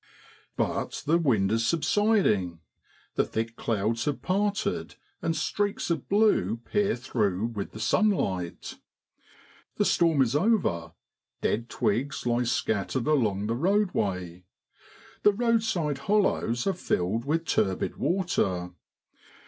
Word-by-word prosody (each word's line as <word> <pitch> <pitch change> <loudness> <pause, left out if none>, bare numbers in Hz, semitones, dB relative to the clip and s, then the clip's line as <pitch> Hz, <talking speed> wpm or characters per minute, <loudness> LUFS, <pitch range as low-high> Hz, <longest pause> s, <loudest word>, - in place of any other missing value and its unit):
But - - -2
the 165 +3 +3
wind 110 - +2
is 115 +1 +1
subsiding, 160 - +2 0.5
the - - +2
thick 115 +1 -3
clouds 115 0 -1
have 145 -2 -2
parted, 200 +2 -1 0.3
and 165 - 0
streaks 200 +4 -1
of 165 - -2
blue 200 - +3
peer 205 -1 +1
through 110 -6 -1
with 100 -3 -4
the 110 - -10
sunlight. 110 - 0 1.0
The - - +2
storm 165 -5 +3
is 125 +2 -1
over, 150 - +1 0.5
dead 115 +2 -1
twigs 130 +7 -1
lie 120 0 +1
scattered 115 +1 -1
along 110 -10 +1
the 115 - 0
roadway. 105 - 0 0.8
The 210 - +5
roadside 220 - 0
hollows 190 - +1
are 195 - +2
filled 110 - -1
with 165 +3 0
turbid 100 -9 0
water. 95 - 0
130 Hz, 115 wpm, -27 LUFS, -, 1.0 s, The